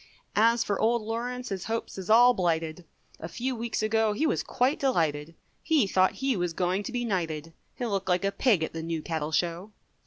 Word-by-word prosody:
As 230 +2 +4
for 205 - -2
Old 230 0 +2
Lawrence 245 +3 -4
his 190 -2 -4
hopes 225 +1 -3
is 185 - -7
all 240 +3 +7
blighted. 165 -3 -1 0.3
A 165 - -6
few 250 +8 -3
weeks 230 -1 -3
ago 220 0 +2
he 260 +10 0
was - - +1
quite 260 +3 0
delighted, 165 - 0 0.3
He 310 -8 +3
thought 185 -1 +2
he 270 -1 -1
was 175 -3 -1
going 180 +3 0
to - - -6
be 245 -1 -2
knighted, 165 -6 -3 0.2
He'll 240 -3 -3
look 195 -1 -2
like 180 +1 +2
a 195 - +1
pig 200 - +2
at - - -4
the 165 - -4
New 165 -1 -3
Cattle 160 -2 -3
Show. 175 +5 -1
200 Hz, 210 wpm, -27 LUFS, 170-235 Hz, 0.3 s, all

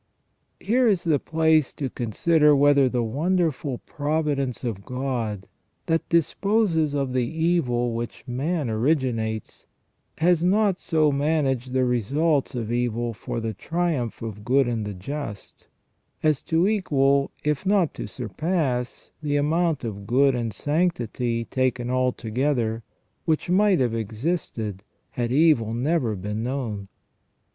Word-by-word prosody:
Here 245 +3 +2
is 190 -5 +2
the 160 -5 +2
place 160 -2 +2
to 140 - -2
consider 150 +6 +3
whether 140 -1 +5
the 125 -1 0
wonderful 150 +1 0
providence 145 -4 -1
of 110 -5 -3
God, 120 -6 -3 0.4
that 165 0 0
disposes 170 -2 +2
of 135 -3 -1
the 125 -2 +1
evil 160 -8 +1
which 115 0 -5
man 145 +4 -1
originates, 115 -2 -1 0.5
has 170 0 +3
not 195 +1 +2
so 155 -3 +2
managed 140 -3 0
the 130 0 +2
results 140 +5 +1
of 115 -2 -3
evil 120 -1 -1
for 115 - -5
the 110 -1 -3
triumph 160 - -2
of 105 -2 -6
good 130 +3 +3
in 115 -3 -2
the 105 -1 -5
just, 110 +1 -7 0.6
as 155 -3 +2
to 165 +3 +2
equal, 140 -9 +2
if 150 +1 0
not 190 -4 +2
to - - -6
surpass, 125 - -2
the 145 -1 -1
amount 155 +1 +1
of 100 -3 -5
good 135 +4 +4
and 120 -2 -2
sanctity, 120 - -1
taken 125 -1 -1
altogether, 125 -1 0 0.4
which 160 +2 0
might 195 0 +4
have 120 -3 +1
existed 110 - -3 0.3
had 120 -1 -2
evil 130 -7 +3
never 125 -3 0
been 105 +3 -4
known. 115 -6 -3
135 Hz, 130 wpm, -24 LUFS, 120-160 Hz, 0.6 s, whether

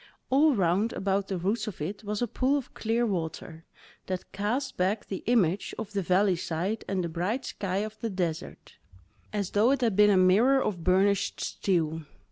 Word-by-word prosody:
All 290 +1 +5
round 195 +4 +1
about 195 0 -1
the 190 - -2
roots 205 +5 -1
of 210 - -6
it 195 +8 -5
was 210 +2 -2
a - - 0
pool 260 +6 +1
of 275 - -7
clear 230 +2 0
water, 165 -4 -4 0.4
that 185 -1 -4
cast 220 +8 -2
back 190 +4 0
the 190 - -5
image 200 -6 +1
of 215 -1 -6
the 200 - 0
valley 185 +1 +3
side 180 +6 -2
and 190 -2 -1
the - - -1
bright 180 +10 -2
sky 190 -2 -3
of 215 0 -10
the 230 - -2
desert, 175 -5 -4 0.5
as 205 -3 -2
though 210 +4 +3
it 275 -1 +2
had 225 -5 +1
been 210 +1 +6
a 200 - +4
mirror 210 +9 +5
of 185 -9 -2
burnished 190 +2 +2
steel. 165 -4 -1
200 Hz, 190 wpm, -28 LUFS, 185-220 Hz, 0.5 s, been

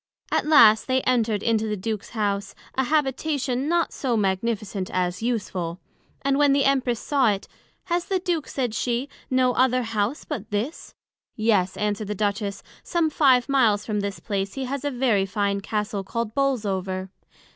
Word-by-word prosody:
As - - +2
last 230 -8 +6
they 260 0 +2
enter'd 225 -5 +1
into 220 -1 +1
the 210 -1 -2
Duke's 215 +1 -4
House, 200 -1 -1 0.2
an 265 - 0
Habitation 280 -1 0
not 340 0 +1
so 245 -4 -1
magnificent 200 -1 -1
as 180 +1 -1
useful; 190 -7 -2 0.4
and 275 +1 +2
when 290 -1 +5
the 275 -1 +3
Empress 260 -4 +2
saw 275 -5 +2
it, 200 -1 -2 0.4
Has 345 0 -1
the 385 - 0
Duke, 350 -5 -2
said 250 -5 -2
she, 245 +4 -1 0.2
no 255 -1 +3
other 255 0 +3
House 225 +4 -2
but 225 -9 -5
this? 215 +10 -4 0.4
Yes, 210 -5 +1
answered 210 0 -1
the 210 - -3
Duchess, 200 0 -2 0.2
some 335 -3 0
five 260 -5 +4
miles 230 -7 +3
from 210 -2 -1
this 200 -1 -3
place 195 -2 -3
he 270 -1 -3
has 275 +2 -4
a 290 - 0
very 240 -7 +1
fine 200 0 -1
Castle 210 0 -2
called 225 +2 -3
Bolesover. 195 -8 -1
230 Hz, 170 wpm, -24 LUFS, 205-270 Hz, 0.4 s, last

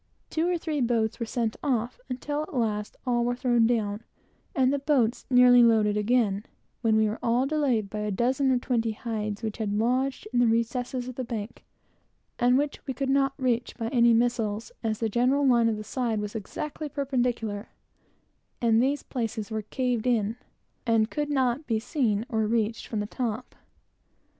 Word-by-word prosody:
Two 325 +2 +1
or 355 - +1
three 310 -3 -2
boat 240 -1 +2
loads 220 0 -2
were 230 - -3
sent 225 -1 -2
off, 245 -4 -1
until, 290 +4 -3
at 305 - -7
last, 210 -3 -1
all 240 -2 +1
were 245 +1 0
thrown 240 -2 +3
down, 215 -3 0 0.5
and 260 -1 +3
the 285 - 0
boats 270 -5 +1
nearly 250 -1 +7
loaded 220 -3 +4
again; 210 -2 +1 0.4
when 225 -2 +3
we 220 0 +4
were 215 +2 -3 0.3
delayed 275 -8 +1
by 210 +2 -5
a 210 0 -2
dozen 255 +6 +1
or 255 - +3
twenty 230 -3 0
hides 215 -1 -4
which 220 -2 -3
had 215 -2 -1
lodged 255 +4 0
in 245 - +3
the 245 - +5
recesses 245 +2 -1
of 255 - -5
the 245 -2 -3
hill, 210 0 -4 0.9
and 245 +1 +4
which 290 +1 -1
we 265 - -3
could 270 +1 -1
not 275 0 +2
reach 245 -3 -1
by 225 -2 -2
any 235 -2 +4
missiles, 230 -2 0
as 220 -1 0
the 225 - 0
general 250 +6 +2
line 235 -3 +4
of 220 - -1
the 215 - -6
side 230 -1 -1
was 210 0 -4
exactly 295 +8 -5
perpendicular, 245 -7 -2 0.9
and 230 -1 +3
these 280 +3 0
places 225 -3 -4
were 220 0 -1
caved 245 +1 -1
in, 225 -3 +1 0.5
and 225 -2 +2
could 295 -1 -2
not 265 0 0
be 225 -2 +1
seen 225 -4 0
or 220 -5 0
reached 225 0 -1
from 215 -2 -2
the - - -2
top. 235 +1 -4
235 Hz, 185 wpm, -27 LUFS, 220-255 Hz, 0.9 s, nearly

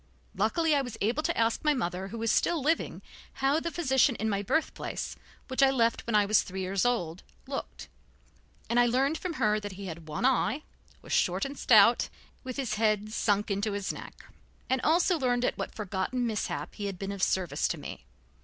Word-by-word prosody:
Luckily 325 -2 +1
I 285 - +3
was 245 -4 -6
able 235 +9 +1
to 335 +2 -1
ask 230 0 +1
my 300 -1 +3
mother, 185 -5 -2
who 230 - -7
was 225 0 0
still 345 - +2
living, 315 +4 -1 0.3
how 275 +3 +2
the 335 - -3
physician 265 -6 +2
in 220 0 -1
my 200 0 0
birth 315 +11 0
place, - - -5 0.3
which 260 +1 -1
I 270 - +7
left 235 -4 +1
when 230 - 0
I 210 -1 +5
was 210 +1 +4
three 190 0 -6
years 190 +2 0
old, 185 -8 0 0.2
looked, 270 0 -6 0.8
and 235 - +2
I 245 - +5
learned 270 +6 +1
from 365 -2 -3
her 215 -6 +2
that 205 -2 -6
he 195 +1 -8
had 165 -3 -7
one 155 +10 -2
eye, 265 +3 +2 0.4
was - - -5
short 185 +2 +2
and 275 +1 -5
stout, 230 -2 +5 0.3
with 255 -2 -6
his 270 -4 -2
head 215 -1 +1
sunk 210 -1 +1
into 200 +1 -1
his 200 -1 -2
neck, - - -11 0.5
and 260 - +2
also 340 +2 +3
learned 245 -2 +1
at - - 0
what - - -5
forgotten 210 +4 -2
mishap 220 -2 -3
he 205 -2 -4
had 195 -2 -5
been 195 +2 -4
of 200 -1 -6
service 185 -2 +1
to - - -3
me. - - -9
230 Hz, 210 wpm, -29 LUFS, 200-270 Hz, 0.8 s, I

